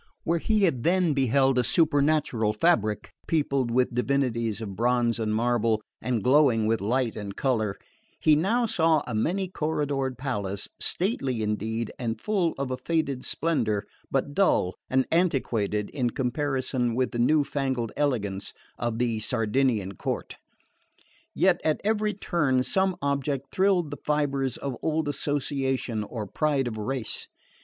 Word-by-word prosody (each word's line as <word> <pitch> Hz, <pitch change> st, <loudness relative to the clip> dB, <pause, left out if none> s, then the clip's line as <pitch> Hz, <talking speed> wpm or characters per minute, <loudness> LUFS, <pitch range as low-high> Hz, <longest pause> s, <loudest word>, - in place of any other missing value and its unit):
Where 170 Hz, 0 st, +1 dB
he 215 Hz, +4 st, +1 dB
had 135 Hz, -10 st, +2 dB
then 180 Hz, -2 st, +3 dB
beheld 135 Hz, 0 st, +3 dB
a -, -, +3 dB
supernatural 145 Hz, -6 st, +2 dB
fabric, 110 Hz, -, +1 dB, 0.2 s
peopled 140 Hz, -5 st, +1 dB
with 125 Hz, +1 st, +1 dB
divinities 120 Hz, -4 st, 0 dB
of 100 Hz, -4 st, -6 dB
bronze 120 Hz, +1 st, +1 dB
and 110 Hz, -1 st, -1 dB
marble, 115 Hz, -1 st, +2 dB, 0.2 s
and 120 Hz, -5 st, -1 dB
glowing 130 Hz, -5 st, +4 dB
with 110 Hz, -1 st, +1 dB
light 120 Hz, +3 st, 0 dB
and 100 Hz, -2 st, -6 dB
colour, 110 Hz, -7 st, 0 dB, 0.4 s
he 155 Hz, -, +5 dB
now 220 Hz, +10 st, +2 dB
saw 160 Hz, -7 st, +2 dB
a 125 Hz, -, -5 dB
many 180 Hz, -, 0 dB
corridored 145 Hz, -6 st, -2 dB
palace, 105 Hz, -7 st, -3 dB
stately 135 Hz, -, 0 dB
indeed, 110 Hz, +2 st, -2 dB
and 115 Hz, -2 st, -2 dB
full 195 Hz, -6 st, 0 dB
of 135 Hz, -1 st, -3 dB
a 130 Hz, -, -2 dB
faded 140 Hz, -2 st, -1 dB
splendour, 115 Hz, -11 st, 0 dB, 0.2 s
but 135 Hz, +1 st, -1 dB
dull 145 Hz, -, +2 dB, 0.2 s
and 130 Hz, 0 st, +2 dB
antiquated 120 Hz, -, 0 dB
in 125 Hz, -5 st, 0 dB
comparison 130 Hz, -1 st, -1 dB
with 130 Hz, 0 st, 0 dB
the 120 Hz, -, -3 dB
new 145 Hz, +5 st, +4 dB
fangled 130 Hz, -5 st, -2 dB
elegance 105 Hz, -9 st, -1 dB, 0.3 s
of 120 Hz, -1 st, -1 dB
the 115 Hz, -2 st, 0 dB
Sardinian 110 Hz, -2 st, 0 dB
court. -, -, -4 dB, 1.0 s
Yet -, -, +3 dB
at 155 Hz, -1 st, +1 dB
every 210 Hz, -1 st, +1 dB
turn 145 Hz, -10 st, +1 dB
some 190 Hz, +3 st, +1 dB
object 140 Hz, -1 st, -1 dB
thrilled 185 Hz, -5 st, +2 dB
the 145 Hz, -, -5 dB
fibres 140 Hz, -3 st, 0 dB
of 140 Hz, -3 st, -4 dB
old 160 Hz, -1 st, 0 dB
association 135 Hz, -5 st, -1 dB
or 105 Hz, 0 st, -5 dB
pride 140 Hz, +3 st, 0 dB
of 110 Hz, -2 st, -4 dB
race. 125 Hz, +1 st, -2 dB
130 Hz, 145 wpm, -26 LUFS, 115-150 Hz, 1.0 s, he